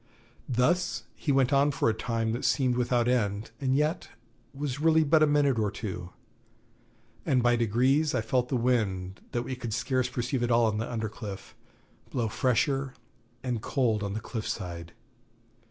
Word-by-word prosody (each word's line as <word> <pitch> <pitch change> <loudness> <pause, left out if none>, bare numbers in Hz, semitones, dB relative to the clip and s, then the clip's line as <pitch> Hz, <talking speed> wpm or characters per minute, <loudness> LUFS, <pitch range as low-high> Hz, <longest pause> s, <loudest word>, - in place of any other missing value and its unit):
Thus 165 +9 +1
he 150 - -1
went 135 0 +3
on 140 +1 +4
for 140 - 0
a 115 - +3
time 115 0 -1
that 120 +3 -3
seemed 125 0 +2
without 120 -1 +1
end, 105 -4 0
and 130 -1 +1
yet 150 +5 0 0.4
was 140 -1 -4
really 160 0 +4
but 155 +1 +4
a 155 - +6
minute 145 -4 +3
or 105 -1 +1
two; 90 -5 -6 1.1
and 125 -2 +2
by 120 0 +4
degrees 130 +7 +2
I - - +1
felt 125 +3 0
the - - 0
wind, 100 -6 0
that 120 - -1
we 130 - -4
could 120 -3 -4
scarce 125 +3 0
perceive 125 +1 -2
at 120 - 0
all 120 0 +4
on 110 -1 0
the 115 - -3
under 110 -2 -2
cliff, 105 -3 -8 0.6
blow 115 -3 -1
fresher 130 +4 0 0.5
and 125 -4 -2
cold 115 -6 0
on 100 -1 -3
the 110 - -2
cliff 110 0 -5
side. 85 -4 -5
120 Hz, 175 wpm, -28 LUFS, 110-135 Hz, 1.1 s, a